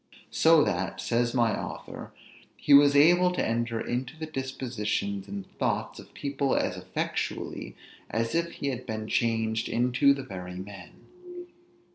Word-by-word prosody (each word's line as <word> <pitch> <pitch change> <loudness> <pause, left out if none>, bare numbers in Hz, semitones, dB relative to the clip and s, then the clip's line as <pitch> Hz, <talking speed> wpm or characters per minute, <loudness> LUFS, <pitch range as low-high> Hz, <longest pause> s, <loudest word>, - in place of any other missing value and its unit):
So 160 -2 +5
that, 95 -2 -2
says 120 +1 0
my 115 -3 +3
author, - - -7 0.5
he 145 - +3
was 145 0 +7
able 175 +5 +6
to - - 0
enter 115 0 -1
into 125 +6 -3
the 160 - -4
dispositions 120 -8 -3
and 100 -1 -6
thoughts - - -1
of - - -14
people 140 -1 -1
as 95 - 0
effectually 90 0 -4 0.3
as 115 0 -1
if 170 0 0
he 140 - -3
had 125 -1 -5
been 110 0 -4
changed 110 -1 0
into 125 +4 +3
the 135 - -6
very 90 -6 -7
men. 95 -1 -10
120 Hz, 145 wpm, -28 LUFS, 105-140 Hz, 0.5 s, was